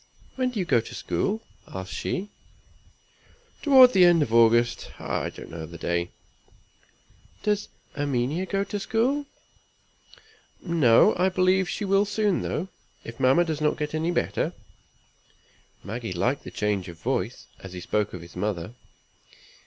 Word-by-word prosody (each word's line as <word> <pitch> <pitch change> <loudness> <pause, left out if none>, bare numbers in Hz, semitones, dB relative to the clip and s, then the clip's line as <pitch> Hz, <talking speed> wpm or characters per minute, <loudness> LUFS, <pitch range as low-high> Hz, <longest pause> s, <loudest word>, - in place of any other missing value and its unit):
"When 255 -1 0
do 245 - -7
you 185 - 0
go 120 - +3
to - - -10
school?" 220 +3 -2 0.2
asked 95 0 -7
she. 200 +3 -3 1.3
"Toward 260 -4 +7
the 185 - +6
end 175 -3 +6
of 115 - -5
August; 115 +1 +4
I - - -2
don't - - -11
know 80 -1 -6
the 85 +1 -10
day." 85 0 -1 1.3
"Does 210 -1 0 0.3
Erminia 145 +5 -1
go 195 +1 0
to 205 +1 -4
school?" 255 +8 0 1.3
"No. 155 -10 +4
I 185 +2 +3
believe 185 0 +2
she 210 - -3
will 195 +1 +3
soon 205 -1 0
though, 180 +5 -3 0.3
if 115 +2 -9
mamma 135 +7 +4
does 155 -2 -3
not 150 - +1
get 150 -1 -3 0.2
better." - - -1 1.3
Maggie 110 -1 -5
liked 120 +11 -1
the - - -6
change 105 -3 -1
of 85 - -10
voice, 115 +2 -2
as 95 -1 -10
he 90 - -6
spoke 105 +3 -1
of 90 -2 -8
his 85 - -14
mother. 90 0 -3
145 Hz, 145 wpm, -26 LUFS, -, 1.3 s, Toward